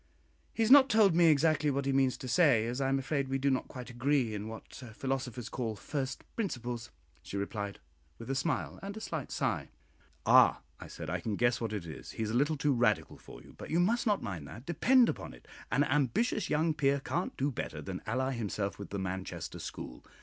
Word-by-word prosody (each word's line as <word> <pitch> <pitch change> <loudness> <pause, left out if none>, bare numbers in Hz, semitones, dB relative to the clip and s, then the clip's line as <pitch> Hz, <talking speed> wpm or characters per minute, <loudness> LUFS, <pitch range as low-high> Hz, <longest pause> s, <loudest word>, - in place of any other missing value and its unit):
"He 225 - 0
has 225 - +2
not 275 -1 +9
told 210 -4 +5
me 170 0 +5
exactly 155 0 +3
what 140 0 -1
he 135 - +1
means 135 -1 +2
to 130 - -7
say, 130 -6 +4
as 120 +3 -2
I 135 - +1
am 135 - +2
afraid 140 0 -1
we 135 0 0
do 140 +1 +1
not 130 - 0
quite 125 -3 -8
agree 125 -1 +1
in 105 +1 -4
what 110 0 -9 0.2
philosophers 130 -3 -3
call 115 -4 -3
'first 135 +5 -4
principles,'" 120 - -3 0.3
she 100 - -6
replied, 100 0 -4 0.4
with 115 - -9
a 135 - -1
smile 140 +2 -1
and 200 +2 -6
a - - -4
slight 160 -9 -5
sigh. - - -1 0.6
"Ah!" - - +6 0.2
I - - -9
said, - - -7
"I - - -1
can 110 -2 -2
guess 120 +2 +2
what 115 -2 -2
it 105 -5 -4
is; 80 - -8
he 110 - -3
is 110 - -2
a - - -1
little 145 +4 +2
too 145 0 +2
Radical 120 -1 +1
for - - -13
you, - - -15
but - - -9
you 165 - +2
must 230 +7 +2
not 205 -2 +2
mind 90 -10 -5
that; 120 - -10
depend 240 - +4
upon - - -4
it, - - -19 0.2
an 145 - +3
ambitious 150 - +1
young 155 +2 +2
peer 140 -2 +2
can't 175 +6 -3
do 140 +2 0
better - - -5
than - - -6
ally 130 +4 0
himself 105 -5 -3
with 100 - -7
the 100 - -4
Manchester 95 -1 -4
school. 60 - -7
135 Hz, 220 wpm, -31 LUFS, 115-155 Hz, 0.6 s, not